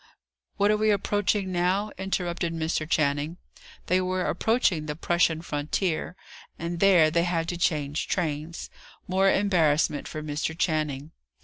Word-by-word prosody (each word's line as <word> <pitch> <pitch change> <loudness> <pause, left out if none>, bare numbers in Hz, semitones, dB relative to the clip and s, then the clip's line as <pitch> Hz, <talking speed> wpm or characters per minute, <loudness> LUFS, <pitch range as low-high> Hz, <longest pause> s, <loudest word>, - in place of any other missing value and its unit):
"What 205 0 +3
are 215 - +2
we 215 0 +2
approaching 205 -1 +1
now?" 185 +4 0
interrupted 175 -3 -2
Mr. 160 -1 -2
Channing. 150 +1 0 0.5
They 185 +1 +2
were 185 0 -1
approaching 185 -6 +1
the 150 - -3
Prussian 165 0 +1
frontier; 155 +3 -2 0.4
and 170 +1 -4
there 175 -5 +5
they 170 +1 +2
had 170 -2 -1
to 175 - -2
change 150 -3 -1
trains: 160 -2 -3 0.4
more 190 +1 +3
embarrassment 160 -8 +2
for 155 - -6
Mr. 150 +2 -3
Channing. 155 -4 -1
170 Hz, 135 wpm, -26 LUFS, 155-185 Hz, 0.5 s, there